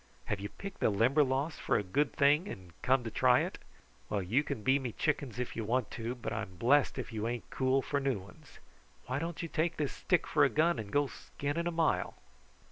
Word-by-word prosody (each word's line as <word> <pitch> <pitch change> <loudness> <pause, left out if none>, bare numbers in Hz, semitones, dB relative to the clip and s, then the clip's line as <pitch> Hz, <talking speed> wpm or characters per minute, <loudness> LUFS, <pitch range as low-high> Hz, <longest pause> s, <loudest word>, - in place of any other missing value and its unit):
Have 105 - -2
you 100 +1 -5
picked 195 -1 -8
the - - +3
Limberlost 135 +7 +2
for - - +2
a - - -1
good 140 +11 +1
thing 150 +6 +3
and 95 - -8
come 130 -1 +3
to 115 - -5
try - - +4
it? - - -4 0.5
Well, 100 -2 -1
you 115 +11 +2
can 140 -8 -4
be 130 +4 +4
me 125 -4 -4
chickens 140 -6 -1
if 125 -1 -3
you 115 - -2
want 120 +2 0
to, 115 +1 -4
but 125 - -5
I'm 95 - -4
blest 130 +9 +3
if - - -5
you 110 0 -2
ain't 120 0 -4
cool 130 0 +2
for 140 - -1
new 135 -4 0
ones. 95 -1 -14 0.5
Why 130 +2 -2
don't 170 +1 -4
you - - -2
take 165 +1 -1
this 150 -3 -1
stick - - +1
for - - +3
a - - +5
gun 165 +3 +2
and 105 -2 -6
go 145 0 +3
skinning 145 +4 -4
a - - 0
mile?" 165 -1 +1
130 Hz, 225 wpm, -32 LUFS, 115-145 Hz, 0.5 s, a